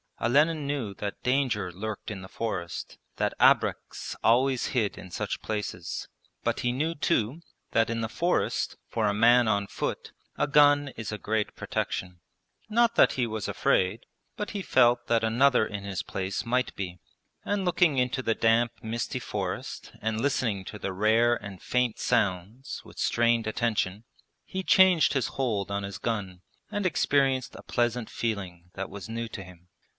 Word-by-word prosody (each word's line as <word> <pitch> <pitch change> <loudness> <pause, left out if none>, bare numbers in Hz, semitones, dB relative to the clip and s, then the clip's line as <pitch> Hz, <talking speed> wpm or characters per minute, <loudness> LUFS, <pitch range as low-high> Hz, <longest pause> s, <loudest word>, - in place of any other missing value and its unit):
Olenin 150 +5 +2
knew 135 -8 -2
that 100 0 -5
danger 125 -8 +1
lurked 105 +4 -5
in 100 -2 -6
the 95 - -9
forest, 95 -6 -4 0.2
that - - 0
abreks - - +2
always 130 +2 +3
hid 110 -6 0
in 95 - -9
such - - -3
places. 105 -5 -4 0.4
But - - 0
he 120 - +1
knew 155 +6 -1
too 145 -2 0 0.3
that 115 0 +3
in 115 0 -1
the 110 - -2
forest, 175 +8 0
for 110 -2 0
a 100 - +1
man 120 +2 +5
on 100 -2 +2
foot, - - -4 0.3
a - - +1
gun 145 -1 +5
is 110 -5 -6
a 105 - -3
great 105 0 -1
protection. 90 -1 -3 0.5
Not 235 +1 +3
that - - +5
he 125 - 0
was 110 -2 -3
afraid, 95 +5 +1 0.3
but 210 - -3
he 205 - -3
felt 120 -7 +3
that 115 -1 +2
another 120 +2 +4
in 100 -2 -6
his 100 -2 -3
place 95 +3 -3
might 125 +2 0
be; 90 -2 -5 0.4
and 200 -2 -1
looking 175 -5 +3
into 125 +1 +1
the 115 -3 0
damp 115 0 +3
misty 115 +1 -3
forest - - -4
and 110 +1 -1
listening 115 -8 0
to 105 - -7
the 95 - -3
rare 110 +4 +3
and 100 -4 -9
faint 125 -2 0
sounds 105 +2 -1
with - - -13
strained 115 -1 +2
attention, 110 -3 -1 0.4
he 190 0 -4
changed 185 -3 +5
his 135 -4 +1
hold 110 -8 -1
on 100 0 -1
his 100 -2 -5
gun 95 -4 -3 0.3
and 205 -2 -2
experienced 135 -6 +1
a - - -10
pleasant 120 -1 0
feeling 95 -6 -4
that 95 0 -5
was 100 +2 -8
new 115 +1 -3
to 100 -3 -7
him. 90 -1 -15
115 Hz, 170 wpm, -28 LUFS, 100-130 Hz, 0.5 s, man